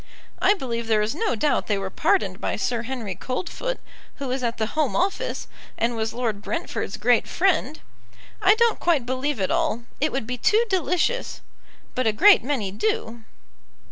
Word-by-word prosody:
I 400 +2 +5
believe 235 - -4
there 215 -2 +3
is 215 - -1
no 395 - 0
doubt 285 +7 +1
they 205 - +1
were 195 -1 -4
pardoned 190 -2 +1
by - - -1
Sir 225 +4 -1
Henry 235 -5 -4
Coldfoot, 370 - -4 0.4
who 275 -2 -5
was 260 +1 -1
at 235 -1 -1
the 220 - 0
Home 310 -4 +1
Office, 380 +3 -1 0.3
and 235 +1 0
was 220 0 -1
Lord 225 -5 -2
Brentford's 330 - -3
great 240 +2 +3
friend. 330 -5 +1 0.6
I 400 +3 +6
don't 465 0 +2
quite 315 -8 +2
believe 260 +1 -1
it 190 - 0
all, 235 - 0 0.2
it 305 +2 +1
would 270 -4 -2
be 250 +1 -4
too 440 - +3
delicious; 375 +6 0 0.5
but 255 -2 0
a 220 - +3
great 395 - +7
many 245 -8 -1
do." 220 +2 -2
250 Hz, 175 wpm, -24 LUFS, 220-330 Hz, 0.6 s, great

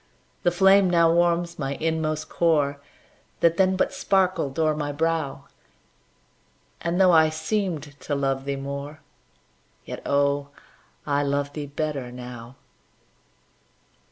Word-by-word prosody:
The 175 - +3
flame 190 +1 +5
now 170 -1 +4
warms 170 0 +1
my 140 -1 -2
inmost 155 -1 -2
core, 145 -4 +1 0.6
That 170 0 +3
then 190 0 +3
but 185 - 0
sparkled 185 -8 0
o'er 155 -1 +2
my 145 -1 -3
brow, 160 -1 -2 1.4
And, 170 +2 -1
though 185 -1 +6
I 160 -2 +5
seemed 160 0 -2 0.2
to 145 - -3
love 135 -1 -1
thee 140 0 -2
more, 140 +2 -6 0.8
Yet, - - -7
oh, 140 0 +1 0.6
I 145 -1 +1
love 145 0 -1
thee 150 -2 -5
better 140 -3 -4
now. 125 0 -9
155 Hz, 125 wpm, -24 LUFS, 140-170 Hz, 1.4 s, though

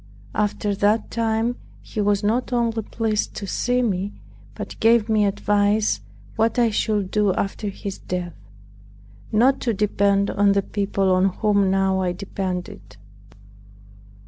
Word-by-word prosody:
After 210 0 0
that 205 +3 +1
time 230 +1 0 0.3
he 215 - -4
was 205 0 +1
not 235 +5 0
only 230 -2 0
pleased 215 0 -2
to 200 - -5
see 245 +5 0
me, 200 -2 -1 0.4
but - - -7
gave 230 -1 +4
me 215 -1 +3
advice 205 +1 +1 0.3
what 225 +2 +1
I 235 -2 +3
should 205 -3 0
do 205 -3 +2
after 200 +1 -2
his 195 0 -6
death; 180 -1 -4 1.0
not 245 +5 +3
to 230 -4 0
depend 200 0 +2
on 200 0 +3
the 200 0 +1
people 195 -2 0
on 185 +1 +3
whom 200 0 +2
now 190 0 +2
I 180 -1 0
depended. 185 -1 -5
205 Hz, 140 wpm, -22 LUFS, 195-225 Hz, 1.0 s, gave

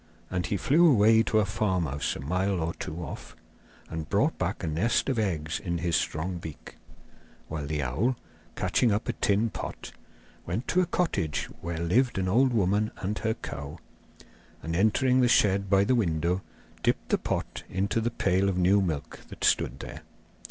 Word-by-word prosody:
And 90 -2 -1
he 100 - 0
flew 160 - +5
away 110 -3 +5
to 115 - +1
a 105 - +4
farmhouse 95 -8 -1
a - - -7
mile 90 +6 0
or 80 +1 -1
two 85 +3 -6
off, - - -8 0.5
and 80 -2 -6
brought - - +2
back - - -2
a - - -1
nest 95 - +1
of 130 -4 0
eggs 80 -7 -1
in 85 -1 -2
his 85 0 0
strong 85 +5 -1
beak; 80 -3 -10 0.7
while 75 -3 -4
the 75 -1 -1
owl, 95 - 0 0.4
catching 120 - +2
up 105 +2 -1
a - - 0
tin 105 +3 +1
pot, - - -6 0.5
went 115 - -3
to 185 - +3
a 180 - 0
cottage 120 - -1
where 85 0 -4
lived 110 +11 +1
an 95 -1 0
old 125 +7 +4
woman 105 -1 +2
and 105 +3 -3
her 110 0 0
cow, 70 +3 -7 0.9
and 80 +2 -3
entering 125 +7 +3
the 125 - +4
shed 100 -4 +3
by 100 0 +5
the 115 - +2
window 90 -4 +1 0.4
dipped - - 0
the - - +2
pot - - -3
into 100 +4 0
the 115 - 0
pail 95 -3 +1
of 95 - -1
new 95 +3 +4
milk 80 -6 -3
that - - -9
stood 65 - +2
there. - - -8
95 Hz, 180 wpm, -28 LUFS, 85-110 Hz, 0.9 s, flew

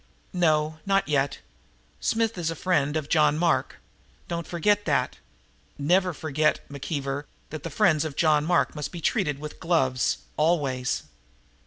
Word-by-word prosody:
"No, 155 -3 +1
not 195 -3 +1
yet. 140 -2 +1 0.6
Smith 225 0 0
is 170 -3 -2
a 165 - -3
friend 150 -4 +1
of 150 -2 -3
John 150 -1 +3
Mark. 170 0 +1 0.5
Don't 170 -1 -4
forget 205 +4 +1
that. 145 -3 0 0.6
Never 180 +6 +2
forget, 155 -1 0
McKeever, 140 0 -3 0.3
that 155 -1 -5
the 165 - -5
friends 155 0 +3
of 155 -3 -5
John 155 -2 +3
Mark 175 +2 +2
must 150 -1 -4
be 175 - -7
treated 165 - 0
with 150 +1 -8
gloves 135 -7 +1 0.2
always!" 145 -6 +1
155 Hz, 145 wpm, -26 LUFS, 145-175 Hz, 0.6 s, John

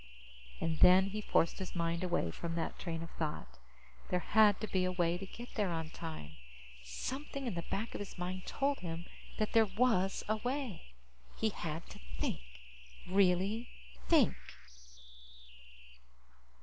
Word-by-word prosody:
And 160 -1 -1
then 190 +2 +7
he 215 +1 -3
forced 170 -4 +2
his 190 -1 -5
mind 170 0 0
away 175 - +1
from 165 - -4
that 165 - -2
train 165 -2 -3
of 165 - -9
thought. 105 - -4 0.5
There 180 - +2
had 210 0 +5
to 215 - -1
be 185 -2 +1
a 185 - +1
way 175 -2 +2
to 190 +2 -6
get 240 +5 -9
there 205 -4 +1
on 160 -2 -3
time. 80 - -7 0.5
Something 265 - -4
in 235 - -1
the 170 - -2
back 220 +4 -2
of - - -4
his 205 -2 -7
mind 180 +1 -4
told 280 0 0
him 170 -1 -5 0.3
that 215 - 0
there 225 -1 +6
was 195 -2 +2
a 215 +1 +2
way. 245 - -4 0.4
He 220 - +2
had 165 -4 -5
to - - -10 0.2
think. - - -1 0.7
Really 195 +4 +3 0.4
think. - - +5
185 Hz, 155 wpm, -34 LUFS, 165-215 Hz, 0.7 s, then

